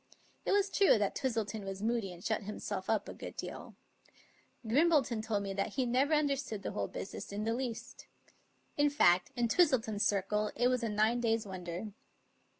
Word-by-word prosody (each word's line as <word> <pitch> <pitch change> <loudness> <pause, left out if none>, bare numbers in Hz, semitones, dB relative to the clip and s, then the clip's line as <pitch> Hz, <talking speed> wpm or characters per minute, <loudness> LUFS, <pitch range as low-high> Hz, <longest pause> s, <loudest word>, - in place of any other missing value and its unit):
It - - +2
was 400 -1 +2
true 395 - +5
that 205 -2 0
Twistleton 225 -5 -2
was 195 +1 -5
moody 225 -4 0
and 175 0 -11
shut 220 -1 0
himself 200 -2 -5
up 220 -2 +1
a - - -6
good - - -8
deal. - - -7 0.9
Grimbleton 270 -2 +3
told 215 -2 -1
me 195 -1 -3
that 195 +1 -2
he 260 -2 0
never 265 +6 +2
understood 275 -8 -1
the - - -3
whole 100 -1 -2
business 195 - -7
in 205 +1 -3
the 225 +1 0
least. 240 -1 -5 0.7
In 290 0 +4
fact, 180 -11 +4
in 240 -1 +1
Twistleton's 230 - +2
circle 210 +1 +1
it 245 +2 +3
was 250 -1 +1
a 230 - -1
nine 215 +3 +2
days' 225 -2 +1
wonder. 185 +1 -5
225 Hz, 180 wpm, -33 LUFS, 200-255 Hz, 0.9 s, true